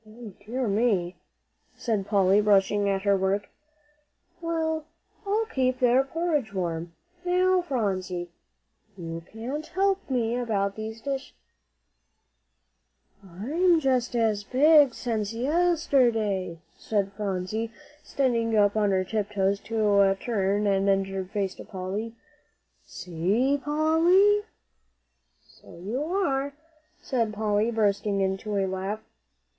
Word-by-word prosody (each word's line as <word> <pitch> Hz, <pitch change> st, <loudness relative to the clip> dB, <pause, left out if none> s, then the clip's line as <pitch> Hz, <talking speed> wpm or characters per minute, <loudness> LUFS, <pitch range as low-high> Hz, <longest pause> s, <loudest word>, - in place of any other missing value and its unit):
"Dear 250 Hz, +2 st, -2 dB
me," 200 Hz, -4 st, +1 dB, 0.6 s
said 210 Hz, -5 st, -2 dB
Polly, 200 Hz, -1 st, +4 dB
rushing 205 Hz, 0 st, +3 dB
at 195 Hz, -1 st, -1 dB
her 200 Hz, -1 st, +3 dB
work; 195 Hz, +1 st, -1 dB, 0.9 s
"well, 320 Hz, -2 st, -1 dB, 0.4 s
I'll 430 Hz, +3 st, +1 dB
keep 255 Hz, -, 0 dB
their 250 Hz, +1 st, +4 dB
porridge 295 Hz, -, -2 dB
warm. 170 Hz, -2 st, -3 dB, 0.3 s
Now, 365 Hz, +1 st, +3 dB
Phronsie, 190 Hz, -, -2 dB, 0.7 s
you 165 Hz, -1 st, -6 dB
can't 260 Hz, +8 st, -5 dB
help 390 Hz, -1 st, 0 dB
me 240 Hz, -3 st, 0 dB
about 200 Hz, -5 st, -1 dB
these 220 Hz, +1 st, -6 dB
dishes." 275 Hz, 0 st, -4 dB, 1.9 s
"I'm 295 Hz, -, +1 dB
just 255 Hz, -4 st, 0 dB
as 220 Hz, -3 st, +1 dB
big 285 Hz, +2 st, +5 dB
since 220 Hz, -3 st, -2 dB
yesterday," 245 Hz, -, +1 dB, 0.2 s
said 200 Hz, -2 st, -1 dB
Phronsie, 205 Hz, +2 st, -3 dB, 0.3 s
standing 230 Hz, -6 st, 0 dB
up 205 Hz, 0 st, +3 dB
on 210 Hz, -2 st, +2 dB
her 190 Hz, -1 st, +2 dB
tiptoes 200 Hz, -1 st, -1 dB
to 205 Hz, -3 st, +2 dB
turn 205 Hz, -3 st, 0 dB
an 195 Hz, 0 st, +2 dB
injured 195 Hz, -1 st, -1 dB
face 195 Hz, -2 st, -2 dB
to -, -, -11 dB
Polly. 200 Hz, +4 st, -5 dB, 0.7 s
"See, 195 Hz, -, 0 dB
Polly." 340 Hz, +7 st, +3 dB, 1.0 s
"So -, -, -17 dB
you 215 Hz, +11 st, -3 dB
are," 285 Hz, -6 st, -1 dB, 0.5 s
said 230 Hz, -5 st, -1 dB
Polly, 210 Hz, +1 st, +1 dB
bursting 205 Hz, -2 st, 0 dB
into 195 Hz, +2 st, -1 dB
a 195 Hz, -, +1 dB
laugh. 190 Hz, +3 st, -3 dB
220 Hz, 110 wpm, -26 LUFS, 195-270 Hz, 1.9 s, big